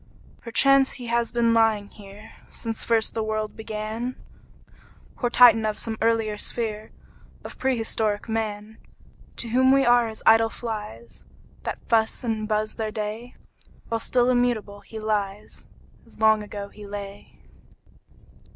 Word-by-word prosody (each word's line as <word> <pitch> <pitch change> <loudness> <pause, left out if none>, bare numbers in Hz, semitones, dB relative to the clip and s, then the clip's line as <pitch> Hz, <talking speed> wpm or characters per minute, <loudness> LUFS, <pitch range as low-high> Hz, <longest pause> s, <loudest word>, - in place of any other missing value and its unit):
Perchance 270 +3 +4
he 250 - -7
has 235 0 0
been 235 -1 +2
lying 220 -3 +2
here 205 +2 -13 0.2
Since 225 -1 -4
first 225 -1 +1
the 225 - -2
world 215 0 -3
began, 220 +3 -5 1.0
Poor 240 - -1
Titan 235 -2 +7
of 215 -1 -1
some 225 -1 -4
earlier 225 -2 +1
sphere 215 -2 -4 0.5
Of - - -10
prehistoric 225 -5 0
Man! 220 -1 -4 0.6
To 235 - -5
whom 260 +3 +4
we 275 0 +4
are 240 -1 +4
as 220 -1 -8
idle 225 0 +6
flies, 210 - -7 0.4
That - - -5
fuss 225 +2 +1
and 220 -2 -2
buzz 215 0 0
their 220 -1 -2
day; 215 +3 -5 0.5
While 230 0 -1
still 245 +2 +2
immutable 240 -5 0
he 210 +2 -11
lies, 210 -1 -3 0.4
As - - -16
long 220 -1 +4
ago 205 -1 -7
he 210 0 -12
lay. 200 0 -9
220 Hz, 140 wpm, -24 LUFS, 210-235 Hz, 1.0 s, Titan